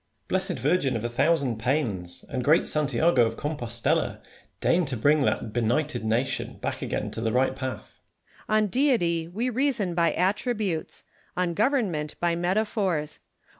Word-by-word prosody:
Blessed - - -1
virgin 140 0 +1
of 110 - -3
the 120 - -1
thousand 135 -1 +1
pains! 110 - -1
and 130 -3 -3
great 155 +5 +4
Santiago 145 -1 +3
of 115 - -6
Compostella! 120 -6 -1 0.4
deign 180 +2 +3
to 130 -3 -3
bring 145 +6 +3
that 115 -4 0
benighted 120 +5 0
nation 115 +4 -1
back - - -4
again - - -3
to - - -5
the 115 -1 0
right 130 +2 +2
path. 130 -1 -6
Lacy. - - -29
On 215 0 +3
Deity 185 - +1
we 225 +9 -2
reason 245 -7 0
by 170 -1 +2
attributes; 200 -2 -1 0.3
on 180 -1 +1
govei'n 230 - +2
ment 150 -1 -5
by 170 -1 +1
metaphors. 185 -3 -1
155 Hz, 155 wpm, -26 LUFS, 125-185 Hz, 0.4 s, great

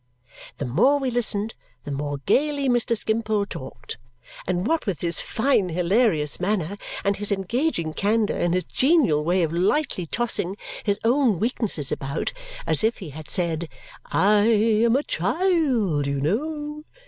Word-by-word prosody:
The - - -3
more 210 - +3
we 265 -3 -1
listened, 225 -2 -1 0.3
the 145 - -6
more 145 +1 -3
gaily 285 -1 +2
Mr. 240 -2 +2
Skimpole 220 -1 0
talked. 150 -9 -8 0.5
And 180 0 0
what 320 0 0
with 180 -8 -2
his 170 -1 0
fine 225 -6 +1
hilarious 175 -3 +1
manner 190 0 -1 0.3
and 200 0 +1
his 205 0 0
engaging 195 - -1
candour 210 +4 +1
and 175 0 +1
his 185 - 0
genial 260 - +3
way 175 +3 +2
of 160 0 -1
lightly 190 - 0
tossing 205 -3 -2 0.3
his 200 -2 +1
own 240 -3 +3
weaknesses 210 - -1
about, 140 +3 -3 0.3
as - - +1
if 225 +2 +2
he 180 -8 -8
had 155 +1 -9
said, 170 -3 -1 0.4
"I 205 +1 +3
am 225 +1 +3
a 280 - +2
child, 240 - +1
you 140 0 -1
know! 295 - -2
205 Hz, 150 wpm, -24 LUFS, 170-245 Hz, 0.5 s, more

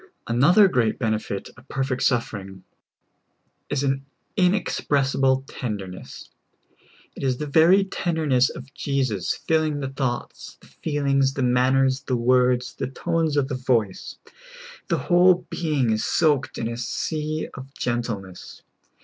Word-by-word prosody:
Another 155 - +5
great 120 -10 +1
benefit 110 -4 -2
of 120 +3 -18
perfect 135 -1 -2
suffering, 100 -6 -1 1.1
is 145 -1 -1
a7i 135 -1 0 0.3
in 185 -1 +4
expressible 135 -7 +1
tenderness. 100 -7 -7 0.8
It - - -9
is 130 -2 0
the 150 - -4
ver}^ 170 +7 +5
tenderness 150 -8 +1
of 135 +2 -10
Jesus 130 - -1
filling 155 -2 +1
the 135 -2 -3
thoughts, 135 -3 -4
the - - -20 0.2
feelings, 140 -3 +1
the 135 - -1
manners, 130 +2 +2
the 130 -3 -1
words, 125 0 +2
the - - -4
tones 160 +2 -1
of 140 -2 +2
the 135 - -4
voice. 120 -6 -1 0.7
The - - +1
whole 180 0 +4
being 145 -8 0
is 110 0 0
soaked 150 -5 +1
in 115 - -2
a 115 0 -4
sea 155 +5 -3
of 135 0 -10
gentleness. 115 -7 -4
135 Hz, 130 wpm, -24 LUFS, 120-150 Hz, 1.1 s, Another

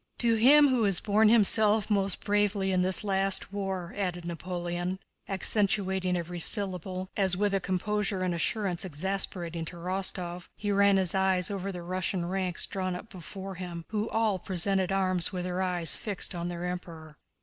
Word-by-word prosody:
"To 235 -1 +2
him 280 +6 +6
who 255 -3 +1
has 195 -3 +4
borne 215 +1 +3
himself 215 -1 +5
most 200 -3 0
bravely 205 -2 +1
in 185 -1 +2
this 185 +2 +3
last 195 -1 +1
war," 190 -3 -4
added 180 -3 -3
Napoleon, 175 +1 -4 0.3
accentuating 190 -2 +1
each 175 0 -5
syllable, 185 -1 -1
as 190 -3 +1
with 205 0 0
a 195 - +2
composure 195 +1 -1
and 180 -1 0
assurance 180 +1 0
exasperating 175 -1 -2
to 175 - -7
Rostóv, 180 0 -3
he 205 -1 -2
ran 200 0 +4
his 185 -3 0
eyes 190 -1 +1
over 195 0 -4
the 175 -2 -7
Russian 185 0 -2
ranks 185 -1 -1
drawn 185 -2 -3
up 210 +5 -9
before 190 +2 -8
him, 175 -2 -7
who 215 +1 -2
all 220 -4 0
presented 190 +1 +1
arms 185 -2 +2
with 180 -2 -4
their 180 +1 -2
eyes 180 -3 0
fixed 200 -2 -3
on 175 -1 -4
their 175 0 -5
Emperor. 165 -4 -7
190 Hz, 170 wpm, -28 LUFS, 180-200 Hz, 0.3 s, him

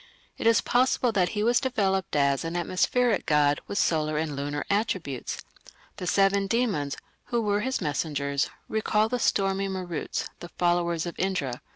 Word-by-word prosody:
It - - +1
is 230 -2 +5
possible 250 0 +2
that 185 -4 +2
he 210 - +1
was 235 +2 +4
developed 195 - 0
as 140 -1 +2
an 165 +1 -4
atmospheric 205 +7 +1
god 145 -1 +3
with 200 - -4
solar 155 -4 +1
and 155 -2 -2
lunar 145 +1 -3
attributes. 190 - -2 0.5
The 180 - -5
seven 195 +1 +3
demons, 195 - 0 0.3
who 240 - -1
were 205 -2 +1
his 260 +3 -1
messengers, 145 -3 -1 0.2
recall 215 0 +1
the 250 +1 -1
stormy 195 -2 +1
Maruts, 185 -4 -3
the 175 - -8
followers 175 -1 +1
of 170 - -4
Indra. 150 -10 -1
185 Hz, 160 wpm, -27 LUFS, 150-210 Hz, 0.5 s, is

